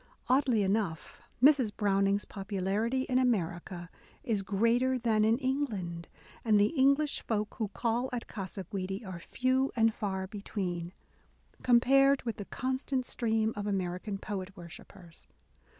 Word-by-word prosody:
Oddly 255 Hz, -4 st, +3 dB
enough, 195 Hz, -5 st, -2 dB, 0.2 s
Mrs. 270 Hz, -6 st, +6 dB
Browning's 200 Hz, 0 st, +2 dB
popularity 205 Hz, +5 st, -1 dB
in 255 Hz, -1 st, +1 dB
America 175 Hz, -7 st, -1 dB, 0.4 s
is 215 Hz, -4 st, 0 dB
greater 230 Hz, +6 st, +2 dB
than 225 Hz, -3 st, +2 dB
in 220 Hz, +2 st, +4 dB
England, 220 Hz, -, -2 dB, 0.4 s
and 215 Hz, -3 st, +4 dB
the 210 Hz, +10 st, +2 dB
English 280 Hz, +2 st, +3 dB
folk 210 Hz, -2 st, -2 dB
who 220 Hz, -, 0 dB
call 235 Hz, +4 st, -1 dB
at 245 Hz, -2 st, -4 dB
Gasa 195 Hz, -1 st, -6 dB
Guidi 195 Hz, +1 st, -4 dB
are 185 Hz, -3 st, -6 dB
few 260 Hz, +8 st, 0 dB
and 225 Hz, -1 st, +3 dB
far 190 Hz, -3 st, -3 dB
between, 185 Hz, -3 st, -4 dB, 0.7 s
compared 275 Hz, +3 st, +4 dB
with 230 Hz, -3 st, -3 dB
the 205 Hz, -, -6 dB
constant 260 Hz, +1 st, -2 dB
stream 225 Hz, -2 st, 0 dB
of 205 Hz, 0 st, -4 dB
American 190 Hz, +1 st, -2 dB
poet 195 Hz, -1 st, -6 dB
worshippers. 170 Hz, 0 st, -12 dB
215 Hz, 135 wpm, -31 LUFS, 195-250 Hz, 0.7 s, Mrs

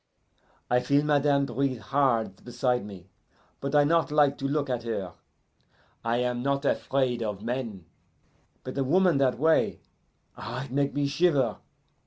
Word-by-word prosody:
I 125 Hz, -, +3 dB
feel 140 Hz, +3 st, +2 dB
madame 145 Hz, -1 st, +3 dB
breathe 130 Hz, +1 st, -1 dB
hard 115 Hz, -4 st, 0 dB
beside 125 Hz, 0 st, -1 dB
me, 95 Hz, -2 st, -11 dB, 0.5 s
but 140 Hz, +1 st, -3 dB
I 145 Hz, -, +6 dB
not 165 Hz, +2 st, +2 dB
like 145 Hz, -2 st, +3 dB
to 135 Hz, -, -1 dB
look 145 Hz, 0 st, -1 dB
at 125 Hz, -2 st, -2 dB
her. 105 Hz, -7 st, -4 dB, 0.9 s
I 115 Hz, +1 st, 0 dB
am 125 Hz, 0 st, -1 dB
not 140 Hz, +2 st, -1 dB
afraid 130 Hz, -3 st, 0 dB
of 105 Hz, -2 st, -4 dB
men, 115 Hz, -7 st, -4 dB, 0.8 s
but 130 Hz, -, -7 dB
a -, -, +2 dB
woman 175 Hz, +2 st, +3 dB
that 130 Hz, -2 st, +2 dB
way 160 Hz, +3 st, +2 dB, 0.6 s
ah, 130 Hz, -, -5 dB
it 140 Hz, -, -13 dB
make 140 Hz, +1 st, 0 dB
me 145 Hz, 0 st, +1 dB
shiver! 140 Hz, -, +2 dB
135 Hz, 155 wpm, -27 LUFS, 120-145 Hz, 0.9 s, I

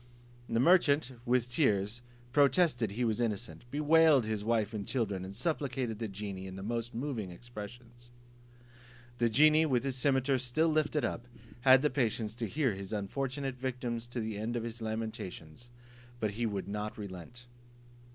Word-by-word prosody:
The 115 Hz, -, +1 dB
merchant, 145 Hz, -2 st, +4 dB, 0.2 s
with 125 Hz, 0 st, +2 dB
tears, 110 Hz, -4 st, +1 dB, 0.3 s
protested 140 Hz, -, +4 dB
he 120 Hz, +3 st, 0 dB
was 115 Hz, +1 st, 0 dB
innocent, 115 Hz, +1 st, -3 dB
bewailed 150 Hz, -2 st, +5 dB
his 110 Hz, -1 st, -2 dB
wife 110 Hz, -1 st, +1 dB
and 105 Hz, -2 st, -3 dB
children, 100 Hz, -7 st, -1 dB
and 95 Hz, +1 st, -7 dB
supplicated 130 Hz, -5 st, -2 dB
the 115 Hz, -, -2 dB
genie, 100 Hz, -1 st, -6 dB
in 95 Hz, -, -8 dB
the 95 Hz, -, -7 dB
most 115 Hz, +2 st, -3 dB
moving 120 Hz, -6 st, -3 dB
expressions. 120 Hz, +4 st, -10 dB, 1.1 s
The 120 Hz, -1 st, +3 dB
genie, 155 Hz, +6 st, +5 dB
with 125 Hz, -4 st, +1 dB
his 135 Hz, -2 st, -1 dB
cimeter 130 Hz, 0 st, +2 dB
still 130 Hz, +6 st, +1 dB
lifted 155 Hz, -1 st, +1 dB
up, 120 Hz, -, -4 dB, 0.3 s
had 130 Hz, +1 st, +6 dB
the 150 Hz, -, +3 dB
patience 110 Hz, -4 st, 0 dB
to 115 Hz, -2 st, -2 dB
hear 135 Hz, 0 st, +1 dB
his 95 Hz, 0 st, -7 dB
unfortunate 130 Hz, +6 st, -3 dB
victims 120 Hz, -2 st, -3 dB
to 120 Hz, 0 st, -5 dB
the 110 Hz, -2 st, -3 dB
end 115 Hz, +3 st, -2 dB
of 120 Hz, -, -1 dB
his 115 Hz, 0 st, -6 dB
lamentations, 110 Hz, -3 st, -5 dB, 0.5 s
but 105 Hz, -3 st, -1 dB
would 105 Hz, -5 st, -2 dB
not 105 Hz, +1 st, -4 dB
relent. 100 Hz, +4 st, -8 dB
120 Hz, 160 wpm, -32 LUFS, 105-130 Hz, 1.1 s, had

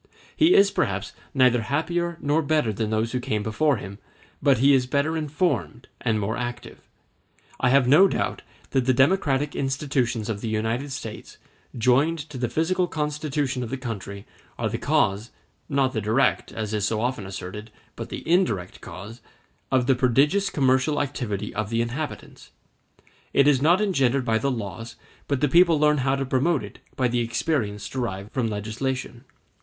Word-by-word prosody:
He 325 Hz, +2 st, +5 dB
is 200 Hz, 0 st, +6 dB
perhaps 100 Hz, 0 st, -1 dB, 0.2 s
neither 125 Hz, -4 st, +4 dB
happier 170 Hz, +7 st, -1 dB
nor 150 Hz, +2 st, +2 dB
better 145 Hz, -7 st, +1 dB
than 110 Hz, +1 st, -2 dB
those 110 Hz, +1 st, 0 dB
who 125 Hz, -, -1 dB
came 110 Hz, -4 st, -2 dB
before 135 Hz, +6 st, +1 dB
him, 100 Hz, -1 st, -9 dB, 0.4 s
but 140 Hz, -2 st, +4 dB
he 140 Hz, +3 st, +5 dB
is 130 Hz, -2 st, +2 dB
better 140 Hz, +4 st, 0 dB
informed 150 Hz, -, -2 dB
and 110 Hz, -2 st, +1 dB
more 105 Hz, +2 st, -2 dB
active. 120 Hz, 0 st, -6 dB, 0.8 s
I 130 Hz, -, +2 dB
have 130 Hz, -1 st, +4 dB
no 155 Hz, +9 st, +7 dB
doubt -, -, -2 dB, 0.3 s
that 130 Hz, -2 st, +1 dB
the 130 Hz, -, +4 dB
democratic 145 Hz, -1 st, +2 dB
institutions 135 Hz, -5 st, -1 dB
of 105 Hz, -3 st, -3 dB
the -, -, -3 dB
United 115 Hz, +6 st, -2 dB
States, 110 Hz, -4 st, -7 dB, 0.4 s
joined 130 Hz, +8 st, +3 dB
to 130 Hz, -, -6 dB
the 120 Hz, -1 st, -1 dB
physical 180 Hz, +6 st, +1 dB
constitution 150 Hz, -4 st, -2 dB
of 120 Hz, -, -4 dB
the 135 Hz, -, -3 dB
country, 100 Hz, -5 st, -6 dB, 0.3 s
are -, -, -1 dB
the -, -, -3 dB
cause 100 Hz, +5 st, +1 dB, 0.4 s
(not 135 Hz, -2 st, +1 dB
the 110 Hz, -, -1 dB
direct, 110 Hz, +7 st, +1 dB
as 110 Hz, -1 st, -4 dB
is 105 Hz, -2 st, -1 dB
so 110 Hz, 0 st, -1 dB
often 120 Hz, -4 st, -2 dB
asserted, 95 Hz, +3 st, -7 dB, 0.3 s
but -, -, -7 dB
the -, -, -7 dB
indirect 160 Hz, -, +1 dB
cause) 110 Hz, +5 st, -9 dB, 0.5 s
of 130 Hz, -2 st, +3 dB
the 135 Hz, -, +4 dB
prodigious 140 Hz, -, +2 dB
commercial 130 Hz, +2 st, +2 dB
activity 115 Hz, -8 st, -3 dB
of 110 Hz, -2 st, -3 dB
the 115 Hz, 0 st, 0 dB
inhabitants. 130 Hz, +6 st, -5 dB, 0.8 s
It 140 Hz, -, +4 dB
is 140 Hz, -3 st, +4 dB
not 170 Hz, +6 st, +4 dB
engendered 135 Hz, -11 st, +1 dB
by 110 Hz, -2 st, +2 dB
the 140 Hz, -, 0 dB
laws, 115 Hz, -2 st, -5 dB, 0.3 s
but 140 Hz, -3 st, -1 dB
the 150 Hz, -, +4 dB
people 170 Hz, +1 st, +5 dB
learns 150 Hz, -1 st, +3 dB
how 135 Hz, +1 st, +1 dB
to 135 Hz, 0 st, -2 dB
promote 135 Hz, +4 st, +1 dB
it -, -, -10 dB, 0.2 s
by 130 Hz, -, +1 dB
the 120 Hz, 0 st, 0 dB
experience 115 Hz, -3 st, -1 dB
derived 105 Hz, -6 st, -4 dB
from 125 Hz, -4 st, -1 dB
legislation. 120 Hz, +4 st, -4 dB
130 Hz, 170 wpm, -24 LUFS, 110-145 Hz, 0.8 s, no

